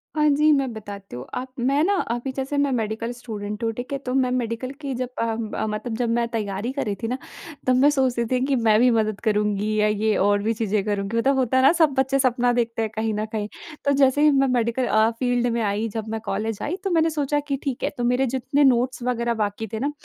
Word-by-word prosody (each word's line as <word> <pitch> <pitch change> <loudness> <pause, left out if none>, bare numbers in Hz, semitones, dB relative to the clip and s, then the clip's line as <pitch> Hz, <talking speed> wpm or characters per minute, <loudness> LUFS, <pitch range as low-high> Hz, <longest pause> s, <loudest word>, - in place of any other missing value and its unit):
हाँ 300 0 +3
जी, 300 +2 +4
मैं 275 -4 +2
बताती 200 - -9
हूँ। 125 +2 -7
आप 255 +1 -3
मैं 275 +5 +2
ना 400 +3 +2 0.2
अभी 240 +3 -2
जैसे 270 +2 -3
मैं 285 -1 +2
मेडिकल 225 0 -2
स्टूडेंट 210 -2 -6
हूँ, 225 - +1
ठीक 245 +4 -7
है। - - 0
तो 250 -2 -4
मैं 255 -2 +2
मेडिकल 245 +1 -2
की 275 -2 -3
जब 255 0 -3
अ - - +1
अ, 225 -1 -2
मतलब 220 +2 -3
जब 240 -2 0
मैं 235 0 +1
तैयारी 215 0 -3
कर 280 - -2
रही 205 -1 -2
थी - - 0
ना 255 +2 -2 0.5
तब 255 - +4
मैं 280 +3 +5
सोच 265 -4 +1
रही 235 - +1
थी 255 - +2
कि 275 -1 +1
मैं 220 -2 +3
भी 250 +1 +5
मदद 215 -2 0
करूँगी 210 -1 +1
या 210 - +4
ये 210 0 +1
और 205 +1 +2
भी 225 +1 +1
चीज़ें 215 -2 -1
करूँगी। 205 +2 -1
मतलब 270 +4 +3
होता 260 0 +1
है 260 - +4
ना 275 - +7
सब 305 -4 +4
बच्चे 270 +1 +2
सपना 245 -1 +2
देखते 230 -1 -1
हैं 220 -1 -2
कहीं 220 0 -1
न 210 +1 -2
कहीं, 210 -2 -2 0.4
तो 280 - +3
जैसे 275 +1 +3
ही 300 -1 +6
मैं 275 -1 +3
मेडिकल 245 0 +1
अ, 220 +1 +4
फील्ड 245 -1 +1
में 235 - 0
आई 210 +2 0
जब 220 0 -3
मैं 225 0 -3
कॉलेज 210 +2 -2
आई 340 - -2
तो 390 - -1
मैंने 325 -1 +3
सोचा 295 -1 0
कि 275 -1 -1
ठीक 270 -4 -3
है, - - +1
तो 240 - -2
मेरे 250 +2 +2
जितने 265 +3 +1
नोट्स 250 -1 +2
वगैरह 235 -1 0
बाकी 205 +2 -3
थे 220 - -2
ना 285 +3 -1
240 Hz, 255 wpm, -23 LUFS, 220-265 Hz, 0.5 s, ना